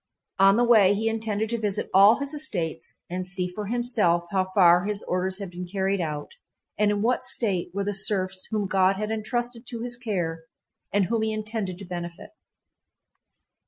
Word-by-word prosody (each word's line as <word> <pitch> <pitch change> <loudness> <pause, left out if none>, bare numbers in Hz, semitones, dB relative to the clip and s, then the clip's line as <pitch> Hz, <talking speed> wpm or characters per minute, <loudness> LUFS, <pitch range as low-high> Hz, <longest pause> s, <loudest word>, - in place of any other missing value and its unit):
On 195 +1 +6
the 240 - +4
way 215 -5 +6
he 220 +2 -1
intended 220 -1 -1
to 235 - -1
visit 210 -2 -2
all 200 +4 +8
his 280 +1 -4
estates 175 - -4
and 180 +1 -3
see 180 0 -2
for 200 +3 -6
himself 220 -8 +1
how 190 -2 +1
far 180 -1 +6
his 205 -1 -2
orders 185 +1 -1
had 195 -3 -6
been 180 0 -6
carried 195 +1 -1
out 150 -3 -4 0.4
and 210 -1 +2
in 205 0 0
what 250 +2 +1
state 200 -9 -1
were 200 +2 -2
the 205 +1 -2
serfs 190 -1 -1
whom 215 -2 -1
God 190 0 +3
had 215 +2 -3
entrusted 240 +2 -3
to 235 -2 -5
his 245 0 -2
care 175 -9 -3 0.5
and 200 -1 +2
whom 225 +3 0
he 220 0 0
intended 215 -4 -3
to 195 - -9
benefit. 175 -1 -7
200 Hz, 185 wpm, -25 LUFS, 185-220 Hz, 0.5 s, all